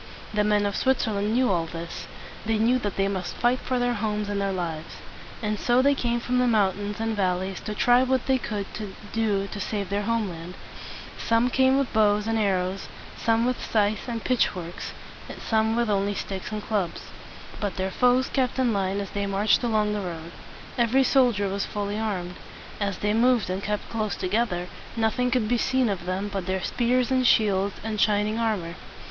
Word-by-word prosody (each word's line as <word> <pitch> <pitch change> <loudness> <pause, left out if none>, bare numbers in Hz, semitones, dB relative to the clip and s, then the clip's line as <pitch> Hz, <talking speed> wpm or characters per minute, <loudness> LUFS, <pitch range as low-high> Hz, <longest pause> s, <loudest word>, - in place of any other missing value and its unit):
The 210 0 +2
men 210 0 +2
of 200 -1 -1
Switzerland 220 -5 +1
knew 250 -3 +3
all 170 -3 0
this. 165 0 -7 0.4
They 220 0 0
knew 235 +4 +3
that 205 -5 -3
they 195 0 +1
must 190 -2 -3
fight 245 +2 +2
for 255 - -2
their 245 0 +1
homes 210 -2 -2
and 200 -1 -1
their 195 0 0
lives. 165 -4 -4 0.5
And 210 -1 -1
so 245 +1 +3
they 280 +1 +5
came 240 -3 0
from 250 +2 0
the 250 - +3
mountains 205 -2 +1
and 225 0 -1
valleys 190 -1 -1
to 210 0 -5
try 245 +3 +5
what 260 -1 +1
they 265 -1 +2
could 210 -4 -3 0.5
do 210 -3 +1
to 205 +1 -7
save 200 -1 -3
their 200 +1 +1
land. 185 -7 -2 0.6
Some 230 +2 +2
came 260 +1 +4
with 275 -2 -1
bows 210 -1 +3
and 225 0 0
arrows, 190 -2 0 0.3
some 230 0 +2
with 250 0 -1
scythes 210 0 0
and 230 -2 -3
pitch 255 -2 +3
forks, 175 -2 -6 0.4
and - - -8
some 220 0 +1
with 235 0 +1
only 200 -1 +1
sticks 195 +1 -5
and 210 -1 -4
clubs. 200 -6 -1 0.6
But 205 -2 -2
their 190 0 -2
foes 250 +3 +3
kept 260 -2 0
in 250 -3 +2
line 195 0 0
as 200 -2 -5
they 200 0 -2
marched 200 +2 +2
along 215 -3 +1
the 210 - -2
road. 170 -2 -6 0.5
Every 240 +3 +4
soldier 245 -7 +3
was 195 +1 -2
fully 205 0 -3
armed. 180 -5 -3 0.4
As 200 -2 -1
they 210 0 0
moved 235 -3 +3
and 190 +1 -2
kept 210 0 -3
close 215 -2 -1
together, 185 -2 -1 0.3
nothing 230 +3 +1
could 240 -3 +1
be 240 +1 +1
seen 260 -2 +2
of 180 -3 -3
them 190 +2 -1
but 195 -2 -3
their 190 0 -1
spears 250 +1 +1
and 260 -1 +3
shields 200 -3 +3
and 215 -1 -2
shining 210 +1 +2
armor. 205 -7 -1
210 Hz, 195 wpm, -26 LUFS, 195-235 Hz, 0.6 s, they